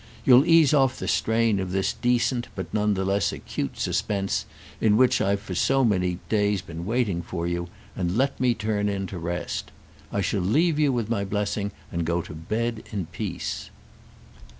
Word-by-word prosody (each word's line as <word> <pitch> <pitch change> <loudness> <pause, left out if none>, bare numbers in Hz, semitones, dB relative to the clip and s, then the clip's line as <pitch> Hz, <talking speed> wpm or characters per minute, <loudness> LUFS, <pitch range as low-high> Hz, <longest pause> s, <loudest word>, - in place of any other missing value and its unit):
You'll 130 +5 +7
ease 165 -3 +6
off 135 -3 +3
the - - -5
strain 110 -2 +2
of 95 -1 -3
this 95 0 0
decent 120 0 +1
but - - -6
none 105 -1 +2
the 95 0 -1
less 100 +1 +1
acute 70 - -5
suspense 100 -2 -1 0.3
in 105 -1 +4
which 130 +1 +4
I've 100 +1 +1
for 95 - -6
so 135 +8 +3
many 90 -5 +1
days 105 -3 +1
been 85 +1 -7
waiting 110 -7 0
for 85 0 -4
you, 85 0 -2 0.3
and 90 +2 -1
let 135 +2 +1
me 125 -2 +2
turn 105 -1 -1
in 100 -1 -2
to 95 -1 -6
rest. 85 +1 -3 0.4
I 100 - 0
shall 100 0 0
leave 150 - +2
you 145 -2 +4
with 120 -4 -1
my 110 -3 0
blessing 100 0 -2 0.2
and 85 0 -1
go 85 +1 0
to - - -9
bed 110 +8 -2
in 100 -5 -2
peace." 75 - -4
105 Hz, 185 wpm, -25 LUFS, 90-120 Hz, 0.4 s, You'll